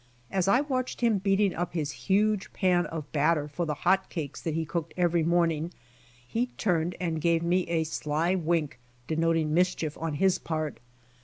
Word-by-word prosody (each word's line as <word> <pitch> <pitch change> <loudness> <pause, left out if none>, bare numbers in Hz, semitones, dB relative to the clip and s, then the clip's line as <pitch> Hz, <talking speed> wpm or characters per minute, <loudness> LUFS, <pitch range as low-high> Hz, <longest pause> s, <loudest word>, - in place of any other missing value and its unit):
As 190 -1 +1
I 245 +7 +5
watched 255 -4 -2
him 230 -4 +3
beat 195 0 +1
ing 200 -3 +3
up 175 0 -3
his 150 -4 -1 0.2
huge 210 +1 +2
pan 180 -3 +2
of 155 -3 -6
batter 150 0 +2
for 165 +3 -3
the 150 - -1
hot 190 +1 +3
cakes 155 -6 -5
that 160 -2 -2
he 165 0 -1
cooked 165 +1 -4
every 175 -1 +2
morning, 165 -1 +1 0.6
he 235 - 0
turned 175 -3 0
and 165 -3 -2
gave 165 0 +2
me 180 +2 +1
a 165 -1 +1
sly 155 +2 -1
wink 165 -6 0 0.3
denoting 160 0 +1
mischief 170 -3 +1
on 165 -2 -2
his 190 +4 +2
part. 155 -3 -3
170 Hz, 180 wpm, -28 LUFS, 160-185 Hz, 0.6 s, I